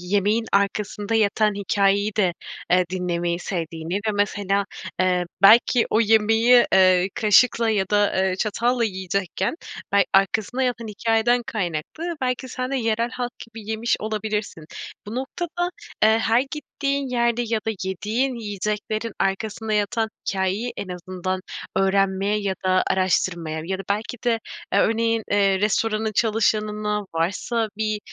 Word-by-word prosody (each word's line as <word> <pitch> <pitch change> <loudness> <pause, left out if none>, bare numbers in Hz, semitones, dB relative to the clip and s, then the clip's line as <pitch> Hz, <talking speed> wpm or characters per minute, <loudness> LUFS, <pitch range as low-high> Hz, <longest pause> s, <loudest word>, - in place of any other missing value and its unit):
yemeğin 205 +5 +1
arkasında 205 +2 0
yatan 215 -1 +2
hikâyeyi 200 +1 +1
de, 185 -4 +2 0.4
eee, 180 0 +4
dinlemeyi 175 -2 -1
sevdiğini 165 -1 -4
ve - - +1
mesela, 200 -1 0 0.4
eee, 180 -1 +2 0.2
belki 230 +3 +6
o 220 - +3
yemeği, 225 +2 +5
eee, 185 0 +5
kaşıkla 225 +2 +4
ya 200 -3 +1
da, 205 -1 +2
eee, 185 - -2
çatalla 235 +4 0
yiyecekken 190 - -2 0.4
bel 200 -1 +5
arkasında 220 +6 +2
yatan 235 -2 -1
hikâyeden 225 +3 +1
kaynaklı 215 - -3
belki 255 0 -2
sen 255 +1 -4
de 275 - 0
yerel 230 -1 0
halk 245 -1 -4
gibi 225 -2 -9
yemiş 225 +2 0
olabilirsin. 215 -5 -3 0.4
Bu 210 - -6
noktada, 345 +7 -3 0.3
eee, 220 +1 +5
her 225 +1 +3
gittiğin 280 -1 -3
yerde 235 -1 +1
ya 225 0 0
da - - +2
yediğin 220 +8 -1
yiyeceklerin 210 +1 -3
arkasında 215 +3 -1
yatan 215 +2 0 0.2
hikâyeyi 195 +5 -1
en 200 - -5
azından 185 +1 -4 0.4
öğrenmeye 195 +1 +1
ya 195 -2 -1
da 185 0 +3
araştırmaya 175 -4 0
ya 190 +2 -3
da 195 - -5
belki 210 +4 -2
de, 235 -2 +2 0.3
eee, - - +4
örneğin, 225 0 +1
eee, 195 -1 +3
restoranın 215 +1 0
çalışanına 210 -1 0
varsa 210 +7 -1
bir, 215 -1 -1
210 Hz, 135 wpm, -23 LUFS, 190-230 Hz, 0.4 s, belki